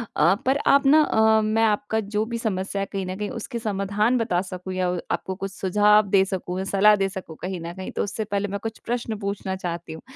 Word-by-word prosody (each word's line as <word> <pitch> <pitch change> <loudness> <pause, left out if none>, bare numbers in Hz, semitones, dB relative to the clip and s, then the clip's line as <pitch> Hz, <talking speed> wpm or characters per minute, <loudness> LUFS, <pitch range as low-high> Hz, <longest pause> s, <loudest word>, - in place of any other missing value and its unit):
अ, 170 +6 +4
पर 265 +2 +3
आप 280 0 +5
ना 305 +3 +7
अ, 220 -5 +4
मैं 215 +1 +1
आपका 215 0 +1 0.2
जो 215 +1 +2
भी 235 0 -4
समस्या 200 -3 -2
है - - -1
कहीं 195 -1 -3
न 185 +1 -4
कहीं 210 0 -3
उसके 235 -1 -5
समाधान 210 +3 0
बता 185 -6 0
सकूँ 185 0 -7
या 185 -1 0
उ 180 -1 -1
आपको 190 - -2
कुछ 195 0 -5
सुझाव 210 +2 +3
दे 190 0 +4
सकूँ, 185 -1 -4
या - - -2
सलाह 205 +2 +5
दे 195 -1 0
सकूँ 185 -5 -8
कहीं 185 -1 -4
न 170 +1 -6
कहीं, 190 0 -7
तो - - -1
उससे 215 +2 -3
पहले 205 0 -2
मैं 200 +1 -4
कुछ 225 0 -5
प्रश्न 235 -2 -2
पूछना 200 -2 -3
चाहती 170 -3 -5
हूँ। 160 - -9
200 Hz, 240 wpm, -24 LUFS, 185-220 Hz, 0.2 s, ना